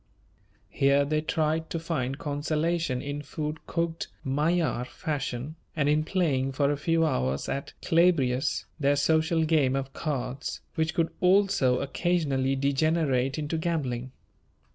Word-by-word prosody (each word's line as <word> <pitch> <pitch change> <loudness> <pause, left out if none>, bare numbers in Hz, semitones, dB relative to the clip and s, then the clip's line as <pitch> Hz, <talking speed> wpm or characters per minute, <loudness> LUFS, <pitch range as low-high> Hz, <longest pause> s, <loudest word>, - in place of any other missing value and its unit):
Here 140 +1 +3
they 155 +1 0
tried 160 +1 0
to - - -2
find 135 -5 -2
consolation 150 -1 -1
in 145 +1 -4
food 150 +2 -4
cooked 170 -1 -2 0.2
Magyar 150 0 +1
fashion, 140 0 -4 0.2
and 150 -3 +1
in 150 +1 +3
playing 145 -7 0
for 140 +2 +2
a - - +1
few 165 +3 +1
hours 65 - 0
at 140 - -4
"Clabrias," 155 -7 +2
their 140 0 +3
social 160 +3 +2
game 150 -5 +3
of 135 0 -3
cards, 135 -3 -3
which 160 0 -1
could 165 -3 +1
also 180 -9 +3
occasionally 140 -4 0
degenerate 140 -1 +1
into 155 +1 -2
gambling. 130 -7 -2
150 Hz, 130 wpm, -27 LUFS, 135-160 Hz, 0.2 s, Here